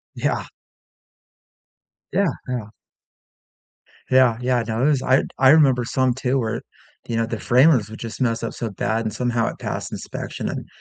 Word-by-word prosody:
Yeah. - - -1 1.7
Yeah, 200 - +2 0.2
yeah. 125 -4 -3 1.4
Yeah, 130 -3 +5
yeah. 125 -1 +1
No, 115 +3 -1
it - - +4
was 145 -3 +3
I 130 +1 +3
d - - -7
I 130 0 +6
remember 135 -5 +5
some 130 +1 +1
too 130 +1 -1
where, 115 -1 -2 0.5
you 115 - -2
know, 115 - +1
the 115 -1 -5
framers 125 -3 +4
would 110 - -9
just 115 +1 -7
mess 115 -2 0
up 115 - -3
so 115 - -4
bad 110 +3 -1
and 110 - -2
somehow 120 0 0
it - - -4
passed - - -4
inspection, - - -5
and - - -5
120 Hz, 170 wpm, -22 LUFS, 115-130 Hz, 1.7 s, I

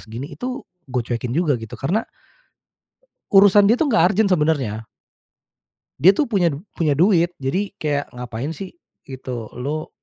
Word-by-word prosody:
segini." 115 +6 -8
Itu 250 +1 -5 0.2
gue 125 -1 -1
cuekin 120 0 -3
juga, 155 -7 +1
gitu. 110 -1 -8
Karena 180 +11 0 1.3
urusan 200 +1 +7
dia 220 - +5
tuh 315 - +2
nggak 215 -8 +4
urgent, 205 -1 +2
sebenarnya. 140 - 0 1.1
Dia 175 +8 +7
tuh 290 - 0
punya 180 -6 +2 0.2
punya 155 -4 +1
duit. 175 +1 +3
Jadi, 185 +10 -2
kayak 145 -2 -2
ngapain 125 +4 -5
sih 190 +4 -7 0.3
gitu, 125 -4 -7
Lu. 150 +5 -3
155 Hz, 145 wpm, -21 LUFS, 125-195 Hz, 1.3 s, urusan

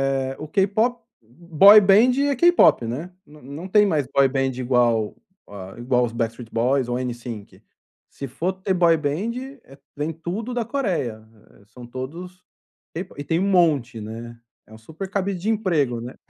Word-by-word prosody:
eh, 135 0 -3
o 155 - -7
K-pop, 215 +6 0 0.2
boy 170 - +5
band 205 +6 +5 0.2
é 280 - 0
K-pop, 345 - +4
né. 150 +11 -5
Não 150 0 -17
não 145 +8 -8
tem 210 +2 +4
mais 155 -8 0
boy 140 -1 +3
band 135 0 -1
igual 120 -4 +1 0.6
igual 125 0 +1
os 115 - -7
Backstreet 115 0 -4
Boys 125 +2 +1
ou 120 0 -2
N-Sync, 120 -4 -7 0.5
se 140 - -8
for 175 +9 -3
ter 190 +1 -2
boy 170 -2 +4
band 155 +10 -2 0.7
tem 155 +2 -3
tudo 195 +10 -5
da 240 -1 -1
Coreia, 175 - -3 0.4
são 120 +2 -13
todos 165 +9 -8 0.8
e - - -5
tem 165 +3 -1
um 195 +2 0
monte, 150 - +2
né, 115 +2 -9 0.3
é 110 - -16
um - - -12
super 160 - -9
cabide 200 -1 -2
de 205 +6 -3
emprego 160 - 0
né. 125 +2 -8
150 Hz, 160 wpm, -22 LUFS, 120-190 Hz, 0.8 s, boy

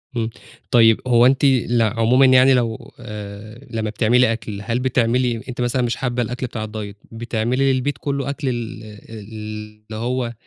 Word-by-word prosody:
إمم، 115 -1 -1 0.4
طيب 115 -2 +5
هو 120 -1 +5
أنتِ 135 +2 +3
ل 120 -3 +3
عمومًا 115 +4 +3
يعني 130 +1 +6
لو 115 -3 -1
آآ، 105 +4 -9
لمّا 110 -1 -2
بتعملي 115 +3 +3
أكل، 105 -3 -6
هل 115 +3 -1
بتعملي 125 -2 +1
أنتِ 125 0 -4
مثلًا 125 +1 0
مش 120 -1 0
حابة 125 -1 -2
الأكل 125 +2 -3
بتاع 110 -2 -5
الDiet 105 -1 -7 0.2
بتعملي 120 +4 0
للبيت 130 +1 -1
كله 140 0 -3
أكل 140 -1 -2
ال 115 -2 -5
ال 110 +1 -11 0.7
اللي - - -4
هو 120 +1 -2
120 Hz, 165 wpm, -20 LUFS, 110-130 Hz, 0.7 s, يعني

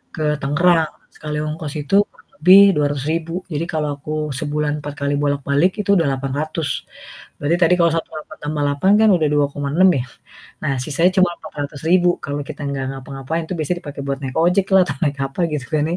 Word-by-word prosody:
ke 155 - -3 0.2
Tangerang, 160 +2 +2 0.2
sekali 150 0 -5
ongkos 155 -1 -5
itu 145 +7 -1
kurang - - -25
lebih 185 +5 +8
Rp200.000. 150 +3 -1 0.2
Jadi 155 +3 -2
kalau 150 -1 -1
aku 150 +2 -6 0.3
sebulan 150 0 -1
4 145 0 -6
kali 140 - +1
bolak-balik 145 +4 +1
itu 200 - -9
udah 165 -4 +3
Rp800.000. 145 +4 -2 0.7
Berarti 155 +4 +1
tadi 175 +2 +5
kalau 170 -1 +4
Rp1.8000.000 155 -1 -6
tambah 150 0 -3
Rp800.000 145 +8 +2
kan 220 - +5
udah 155 -3 +1
Rp2.600.000 145 +5 +2
ya. 125 - -2 0.6
Nah 135 - 0
sisanya 165 +6 +2
cuma 185 -2 +4
Rp400.000 155 +5 0 0.2
kalau 145 +1 -3
kita 150 -1 -7
enggak 135 -1 -3
ngapa-ngapain, 135 +4 -5
itu 180 - -4
biasa 155 +3 -1
dipakai 145 -4 -8
buat 135 -1 -2
naik 130 -1 -5
ojek 180 +3 +3
lah 190 - +7
atau - - -4
naik 145 -1 -1
apa 135 +5 -4
gitu 140 -3 -3 0.2
nih. 175 - -1
150 Hz, 180 wpm, -20 LUFS, 140-165 Hz, 0.7 s, lebih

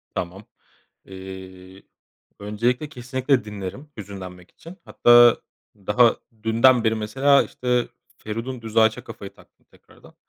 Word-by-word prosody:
Tamam. 95 +4 -5 0.6
Eee, 95 0 -11 0.6
öncelikle 120 +7 -2
kesinlikle 130 -1 -1
dinlerim 105 +8 -8
hüzünlenmek 95 -3 -10
için. 170 +3 -14
Hatta, 120 -1 +5 0.3
daha 105 +4 +2 0.3
dünden 115 +2 +4
beri 110 -1 +1
mesela 135 +6 +2
işte 125 -1 -2 0.3
Feridun 115 +4 -6
Düzağaç'a 110 0 +1
kafayı - - -10
taktım - - -24
tekrardan. - - -21
110 Hz, 105 wpm, -22 LUFS, 100-125 Hz, 0.6 s, Hatta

